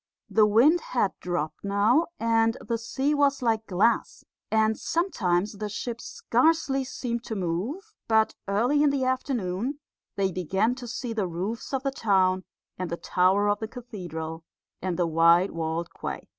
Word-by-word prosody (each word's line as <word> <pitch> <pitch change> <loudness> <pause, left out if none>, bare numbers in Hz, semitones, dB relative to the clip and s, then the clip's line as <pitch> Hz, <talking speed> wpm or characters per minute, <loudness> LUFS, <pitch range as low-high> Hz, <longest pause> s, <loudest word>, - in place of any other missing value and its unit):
The 215 -1 +5
wind 270 +11 +5
had 205 -6 0
dropped 175 -4 -3
now, 205 +10 +3
and 225 0 +2
the 230 -1 -3
sea 270 +5 -1
was 280 -2 +2
like 225 -2 +1
glass, 200 +6 +1 0.3
and 220 0 +3
sometimes 205 - -1
the 210 -1 -3
ship 235 +3 -5
scarcely 270 +1 +1
seemed 240 -2 -4
to 220 - -4
move, 210 - -3
but 220 -1 +3
early 240 +9 +2
in 295 - +5
the 280 -2 0
afternoon 255 -1 -1 0.4
they 195 -1 +1
began 190 +6 0
to 250 -1 -8
see 235 0 -4
the 210 -4 -1
roofs 185 +7 -4
of 270 -1 -1
the 275 - 0
town 190 -6 +2 0.3
and 185 -2 -3
the 170 - -3
tower 190 +4 +2
of 205 0 +1
the 220 - -4
cathedral 175 -10 -7 0.4
and 180 -2 -2
the 175 - +2
white 170 +3 +4
walled 165 +1 -2
quay. - - -6
220 Hz, 160 wpm, -26 LUFS, 185-250 Hz, 0.4 s, The